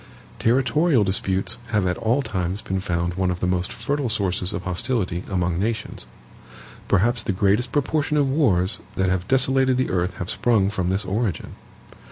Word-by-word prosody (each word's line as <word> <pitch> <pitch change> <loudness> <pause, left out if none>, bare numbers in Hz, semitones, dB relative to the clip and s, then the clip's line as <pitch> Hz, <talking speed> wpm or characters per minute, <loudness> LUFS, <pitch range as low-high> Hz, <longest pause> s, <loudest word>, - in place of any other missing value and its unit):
Territorial 130 +3 +3
disputes 95 0 -1
have 105 -5 +1
at 90 0 +1
all 120 +5 +1
times 95 -2 -3
been 95 0 -2
found 85 -2 -1
one 95 0 0
of 90 -1 -2
the - - -1
most 90 0 -1
fertile 145 -3 -2
sources 95 -4 0
of 85 - -4
hostility 90 0 -2
among 90 -2 0
nations. 110 +2 -3 0.8
Perhaps 115 +5 +2
the - - -2
greatest 100 +5 +1
proportion 150 +2 0
of 145 -2 +3
wars 110 - +2 0.2
that 95 -1 +1
have 95 0 -1
desolated 130 0 +2
the 130 - 0
earth 90 0 0
have 90 +3 -4
sprung 105 -5 +2
from 90 -3 -1
this 95 +1 -1
origin. 100 -1 -2
100 Hz, 170 wpm, -23 LUFS, 90-125 Hz, 0.8 s, Territorial